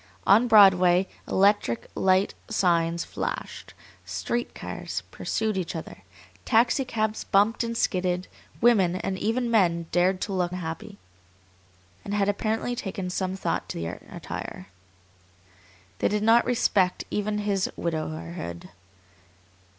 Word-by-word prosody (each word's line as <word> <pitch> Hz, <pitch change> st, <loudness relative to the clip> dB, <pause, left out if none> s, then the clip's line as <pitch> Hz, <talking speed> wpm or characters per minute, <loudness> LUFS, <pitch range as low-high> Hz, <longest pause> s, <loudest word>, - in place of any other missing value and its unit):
On 220 Hz, +5 st, +5 dB
Broadway 190 Hz, -4 st, +6 dB, 0.2 s
electric 200 Hz, -, +2 dB
light 190 Hz, +1 st, +2 dB, 0.2 s
signs 170 Hz, -2 st, +1 dB
flashed, -, -, -5 dB, 0.3 s
street 240 Hz, 0 st, -3 dB
cars -, -, -5 dB
pursued 220 Hz, -2 st, -2 dB
each 180 Hz, -2 st, -3 dB
other, 160 Hz, -, -7 dB, 0.4 s
taxicabs 230 Hz, -2 st, +1 dB
bumped 210 Hz, +3 st, +3 dB
and 230 Hz, 0 st, -3 dB
skidded, 180 Hz, -2 st, 0 dB, 0.3 s
women, 200 Hz, -7 st, +4 dB
and 190 Hz, 0 st, -3 dB
even 235 Hz, +2 st, 0 dB
men, 170 Hz, -6 st, +2 dB
dared 180 Hz, +2 st, +2 dB
to 200 Hz, -, -3 dB
look 180 Hz, -1 st, -1 dB
happy, 180 Hz, +3 st, -6 dB, 1.1 s
and 205 Hz, -, -3 dB
had 200 Hz, -1 st, +1 dB
apparently 220 Hz, +4 st, -1 dB
taken 190 Hz, -4 st, -4 dB
some 185 Hz, 0 st, -2 dB
thought 190 Hz, -, -2 dB
to -, -, -4 dB
their 85 Hz, 0 st, -5 dB
attire. 95 Hz, +1 st, -7 dB, 1.3 s
They -, -, +2 dB
did 210 Hz, 0 st, -1 dB
not 230 Hz, +2 st, +5 dB
respect 200 Hz, -6 st, +1 dB
even 210 Hz, 0 st, -1 dB
his 205 Hz, -2 st, 0 dB
widowerhood. 155 Hz, -, -4 dB
195 Hz, 120 wpm, -26 LUFS, 180-215 Hz, 1.3 s, Broadway